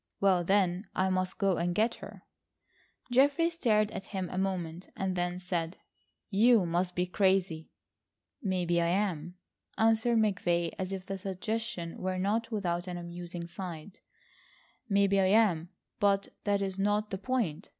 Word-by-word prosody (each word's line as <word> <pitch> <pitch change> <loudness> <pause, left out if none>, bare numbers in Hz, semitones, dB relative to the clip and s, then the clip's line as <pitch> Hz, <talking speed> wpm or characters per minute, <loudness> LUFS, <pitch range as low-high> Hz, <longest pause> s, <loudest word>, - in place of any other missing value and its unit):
"Well, 190 -3 +3
then, 190 +1 +1
I 190 0 +2
must 185 0 -1
go 195 -3 +2
and 175 +1 -1
get 225 +4 +2
her." - - -10 0.9
Geoffrey 285 +6 +4
stared 215 -10 +2
at 190 - -6
him 190 -3 -4
a - - -4
moment, 180 -2 -3
and 190 -1 -2
then 175 0 -1
said: 175 -1 -3 0.5
"You 220 0 +5
must 175 +2 -1
be 180 - +1
crazy." 185 -4 +1 0.7
"Maybe 175 -3 +1
I 170 - +2
am," 175 -3 -1 0.4
answered 225 +1 +3
McVay, 175 -6 +1
as 185 0 -2
if 190 -1 -5
the 195 0 -5
suggestion 195 -1 -4
were 185 0 -1
not 210 +5 0
without 180 -5 -2
an 180 -1 -4
amusing 175 0 -6
side. 175 0 -8 0.9
"Maybe 200 -1 +3
I 190 - +4
am, 190 -5 +3 0.3
but 200 -1 +2 0.2
that 200 -1 +2
is 190 0 -3
not 205 +1 +1
the 190 - -3
point. 205 -7 -2
190 Hz, 150 wpm, -30 LUFS, 175-205 Hz, 0.9 s, You